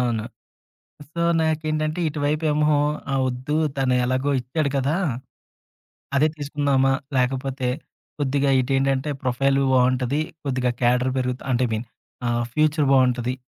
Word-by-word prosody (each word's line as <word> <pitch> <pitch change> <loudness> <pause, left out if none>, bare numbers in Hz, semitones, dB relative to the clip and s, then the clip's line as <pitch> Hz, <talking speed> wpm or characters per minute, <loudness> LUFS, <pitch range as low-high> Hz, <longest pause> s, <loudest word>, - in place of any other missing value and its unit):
అవును. 120 -3 0 0.9
సో, 170 - -3 0.2
నాకేంటంటే, 155 0 -1
ఇటువైపేమో 150 0 +1 0.3
ఆహ్, 135 - +1
వద్దు 130 +4 -2 0.2
తను 130 -2 +2
ఎలాగో 130 +3 0
ఇచ్చాడు 140 +4 -2
కదా! 135 +4 +1 1.2
అదే 150 +3 +4
తీసుకుందామా, 140 -2 +1 0.2
లేకపోతే 130 0 0 0.5
కొద్దిగా 140 0 +1
ఇటేంటంటే, 135 +2 0
ప్రొఫైలు 135 +2 +2
బావుంటది. 130 +2 +2 0.3
కొద్దిగా 130 -2 0
క్యాడర్ 125 +2 +2
పెరుగుత 125 0 -2
అంటే 125 +1 +2
ఐ - - -7
మీన్ 110 +2 -4 0.4
ఆహ్, 120 0 0
ఫ్యూచర్ 155 -1 +2
బావుంటది. 125 -2 +2
135 Hz, 115 wpm, -23 LUFS, 125-145 Hz, 1.2 s, అదే